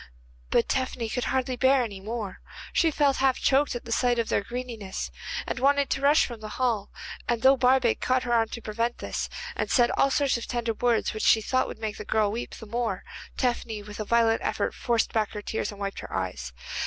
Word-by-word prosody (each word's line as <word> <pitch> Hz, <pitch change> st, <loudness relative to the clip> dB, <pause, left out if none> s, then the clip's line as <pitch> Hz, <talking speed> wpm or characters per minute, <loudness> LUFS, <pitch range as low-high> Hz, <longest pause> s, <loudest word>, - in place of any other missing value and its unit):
But 235 Hz, -, +3 dB
Tephany 255 Hz, -3 st, -1 dB
could 245 Hz, +2 st, -2 dB
hardly 260 Hz, -1 st, 0 dB
bear 260 Hz, +1 st, +4 dB
any 205 Hz, -4 st, -6 dB
more. 210 Hz, -1 st, -5 dB, 0.3 s
She 330 Hz, -, +4 dB
felt 285 Hz, -3 st, +2 dB
half 265 Hz, -1 st, +3 dB
choked 275 Hz, -1 st, +2 dB
at 240 Hz, -, -6 dB
the 230 Hz, -, -7 dB
sight 245 Hz, +1 st, +2 dB
of 230 Hz, -1 st, 0 dB
their -, -, +2 dB
greediness, 230 Hz, -3 st, -5 dB, 0.3 s
and -, -, -3 dB
wanted 280 Hz, +1 st, +3 dB
to 270 Hz, -, 0 dB
rush 290 Hz, +2 st, +5 dB
from 235 Hz, -3 st, -7 dB
the 215 Hz, 0 st, -7 dB
hall, 235 Hz, -6 st, 0 dB, 0.4 s
and 235 Hz, -2 st, 0 dB
though 265 Hz, +1 st, +7 dB
Barbaik 255 Hz, -1 st, +3 dB
caught 255 Hz, 0 st, +2 dB
her 240 Hz, -, -1 dB
arm 225 Hz, -1 st, +3 dB
to 230 Hz, -, -6 dB
prevent 230 Hz, +3 st, -1 dB
this, -, -, -3 dB, 0.3 s
and -, -, -2 dB
said 240 Hz, -2 st, +4 dB
all 275 Hz, -, +3 dB
sorts 275 Hz, -2 st, +2 dB
of 235 Hz, -, -6 dB
tender 235 Hz, -2 st, -1 dB
words 235 Hz, +1 st, +1 dB
which 215 Hz, -, -4 dB
she 225 Hz, -, +5 dB
thought 255 Hz, +4 st, +1 dB
would -, -, -7 dB
make 220 Hz, -1 st, -4 dB
the -, -, -6 dB
girl 215 Hz, -2 st, +1 dB
weep 230 Hz, +3 st, -5 dB
the 225 Hz, -, -10 dB
more, 225 Hz, -3 st, -2 dB, 0.3 s
Tephany 235 Hz, -4 st, -1 dB
with 210 Hz, 0 st, -9 dB
a -, -, -1 dB
violent 230 Hz, +1 st, +3 dB
effort -, -, -1 dB
forced 235 Hz, -2 st, 0 dB
back 215 Hz, -2 st, 0 dB
her 210 Hz, -, -5 dB
tears, 220 Hz, -, -2 dB
and 205 Hz, -, -11 dB
wiped 200 Hz, -1 st, -3 dB
her -, -, -8 dB
eyes. 80 Hz, -11 st, -3 dB
235 Hz, 225 wpm, -27 LUFS, 220-255 Hz, 0.4 s, though